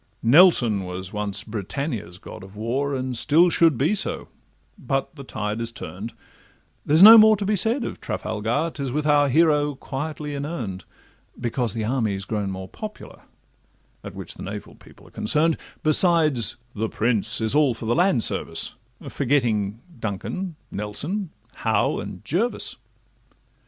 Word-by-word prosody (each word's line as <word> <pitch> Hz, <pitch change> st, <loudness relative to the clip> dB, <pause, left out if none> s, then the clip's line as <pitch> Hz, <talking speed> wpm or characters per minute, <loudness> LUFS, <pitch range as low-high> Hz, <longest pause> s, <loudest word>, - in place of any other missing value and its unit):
Nelson 120 Hz, -, +5 dB
was 90 Hz, +1 st, -7 dB
once 105 Hz, -1 st, -2 dB
Britannia's 110 Hz, -, -5 dB
god 95 Hz, -, -11 dB
of 95 Hz, +1 st, -13 dB
war, 130 Hz, +6 st, -2 dB
And 130 Hz, -1 st, -3 dB
still 160 Hz, +8 st, +4 dB
should 165 Hz, -6 st, +3 dB
be 150 Hz, -, +2 dB
so, 210 Hz, -, -2 dB, 0.5 s
but 135 Hz, +4 st, -3 dB
the 140 Hz, -, -9 dB
tide 105 Hz, -3 st, -4 dB
is 115 Hz, 0 st, -3 dB
turn'd; 110 Hz, 0 st, -8 dB, 0.7 s
There's 155 Hz, +5 st, +5 dB
no 225 Hz, +2 st, +12 dB
more 215 Hz, 0 st, +6 dB
to 200 Hz, -, -3 dB
be 210 Hz, +2 st, +1 dB
said 225 Hz, +7 st, +1 dB
of -, -, -6 dB
Trafalgar, 115 Hz, +10 st, -2 dB
'Tis 140 Hz, -3 st, -4 dB
with 150 Hz, +3 st, -2 dB
our 145 Hz, -1 st, +4 dB
hero 150 Hz, 0 st, +3 dB
quietly 150 Hz, +2 st, -5 dB
inurn'd; 135 Hz, -, -5 dB, 0.5 s
Because 120 Hz, -2 st, -1 dB
the 110 Hz, -2 st, -2 dB
army 110 Hz, -4 st, 0 dB
's 95 Hz, -, -5 dB
grown 105 Hz, -1 st, -2 dB
more 95 Hz, 0 st, -6 dB
popular, 215 Hz, -, -9 dB, 0.8 s
At -, -, -9 dB
which -, -, -7 dB
the -, -, -12 dB
naval -, -, -7 dB
people -, -, -18 dB
are -, -, -18 dB
concern'd; 160 Hz, +1 st, +1 dB, 0.3 s
Besides, 155 Hz, -, +4 dB, 0.2 s
the 110 Hz, +1 st, -2 dB
prince 110 Hz, -2 st, 0 dB
is 110 Hz, 0 st, 0 dB
all 145 Hz, -5 st, +3 dB
for 115 Hz, -, -8 dB
the 115 Hz, -, +1 dB
land 170 Hz, -, +3 dB
service, -, -, -1 dB, 0.3 s
Forgetting 115 Hz, -6 st, 0 dB, 0.2 s
Duncan, 155 Hz, -, -4 dB, 0.2 s
Nelson, 155 Hz, -, -3 dB, 0.3 s
Howe, 110 Hz, -2 st, 0 dB
and -, -, -8 dB
Jervis. 220 Hz, -, -1 dB
130 Hz, 150 wpm, -23 LUFS, 110-155 Hz, 0.8 s, no